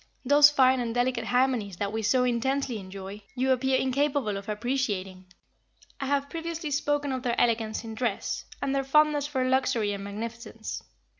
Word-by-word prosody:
Those 290 +2 +8
fine 260 -3 +4
and 235 -1 -2
delicate 245 -2 0
harmonies 245 -6 +1
that 200 +2 -2
we 220 - -1
so 235 +4 +3
intensely 250 0 0
enjoy, 195 +1 -8
you 260 +1 +1
appear 260 +1 +2
incapable 265 -4 0
of 195 +1 -6
appreciating." 210 -5 -2 0.7
I 275 - -3
have 280 0 +1
previously 330 0 -5
spoken 290 0 0
of 260 -1 -2
their 240 -1 -1
elegance 225 -2 +1
in 225 -1 -7
dress, 220 -2 -2 0.2
and 275 -1 0
their 275 0 +1
fondness 295 +1 +3
for 260 -3 -1
luxury 255 -5 +1
and 200 0 -5
magnificence. 225 +2 -6
250 Hz, 165 wpm, -27 LUFS, 220-275 Hz, 0.7 s, Those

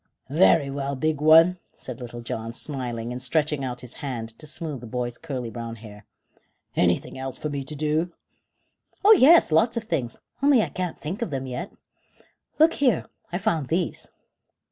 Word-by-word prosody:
"Very 150 -3 +4
well, 140 0 -3
big 155 +2 -1
one," 165 +4 +6 0.2
said 125 -1 -9
Little 120 -1 -7
John, 115 -1 -5
smiling 120 -4 -4
and 125 +1 -5
stretching 150 +2 0
out 125 -1 -4
his 125 -1 -9
hand 120 -5 -4
to 155 - -9
smooth 150 -4 -4
the 120 - -9
boy's 120 +1 -3
curly 130 -7 -5
brown 115 -1 -6
hair. 105 -2 -13 0.7
"Anything 90 +8 +1
else 130 -1 -5
for 150 - -4
me 140 -1 -3
to 150 +3 -8
do?" 155 +4 0 0.9
"Oh 425 - +9
yes, 330 - +7
lots 225 +10 +3
of 230 - -1
things, 130 - -3 0.2
only 275 -5 +5
I - - -3
can't 180 -2 -4
think 170 +8 -5
of 235 - -1
them 135 -2 -3
yet. 130 +9 -5 0.9
Look 320 +2 +5
here, 250 - +2 0.3
I 175 - -1
found 180 - 0
these." 170 +2 -2
140 Hz, 175 wpm, -25 LUFS, 125-170 Hz, 0.9 s, Oh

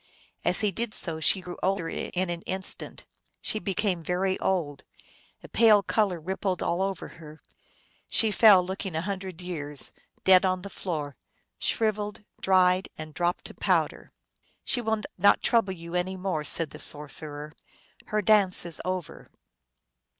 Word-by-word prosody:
As - - +2
he 210 -2 +1
did 225 +3 -4
so 165 -3 -4
she 185 +4 +2
grew 180 -1 -8
older 190 -3 0
in 180 +2 -3
an 170 -1 -5
instant, 190 0 -2 0.3
she 215 - -2
became 195 -2 -1
very 185 +3 0
old; 165 -7 -1 0.6
a - - -10
pale 215 -3 +5
color 195 -4 0
rippled 185 +2 -2
all 175 +2 0
over 195 -2 -2
her; 155 -1 -12 0.7
she 220 -2 +3
fell, 200 -3 +6
looking 190 -1 -5
a 160 - 0
hundred 190 -2 -5
years, 150 -6 +1 0.3
dead 185 0 +6
on 185 -1 0
the 200 - -8
floor, 150 -7 -5 0.4
shriveled, 210 -2 -1 0.2
dried, 185 0 +3
and 155 -1 -8
dropped 175 +2 -1
to - - -7
powder. - - -1 0.3
" - - -41
She 245 - 0
will 220 -1 -1 0.2
not 200 - +4
trouble 225 -5 +2
you 170 -1 -10
any 180 +1 -1
more," 180 -5 -2
said 160 +1 +1
the - - -10
sor 150 0 +3
cerer. 150 0 -4 0.3
" - - -27
Her 210 0 -1
dance 200 -4 +4
is 170 -2 -2
over." 185 -2 -5
185 Hz, 160 wpm, -27 LUFS, 170-200 Hz, 0.7 s, fell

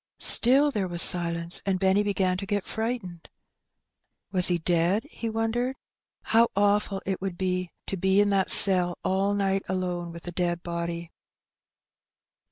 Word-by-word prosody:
Still 275 +5 +5
there 205 -7 -3
was 175 -1 -7
silence, 170 -1 +1
and 195 -2 -2
Benny 190 +1 +1
began 195 -3 -1
to 195 - -8
get 205 -1 -3
fright 230 +1 -4
ened. 175 -2 -13 1.0
Was 185 -2 +4
he 175 - 0
dead? 175 +5 -1
he 230 - -6
wondered. 225 +3 -3 0.5
How 230 +1 +2
awful 205 -1 -1
it 190 -1 -4
would 190 -2 -6
be 185 -1 -3 0.2
to 195 - -6
be 190 +2 0
in 205 0 +1
that 195 -1 0
cell 180 -3 +6
all 195 +2 -1
night 195 -1 -1
alone 180 -2 -4
with 170 +1 -12
a - - -5
dead 175 -1 -3
body! 170 -1 -6
190 Hz, 160 wpm, -24 LUFS, 175-205 Hz, 1.0 s, cell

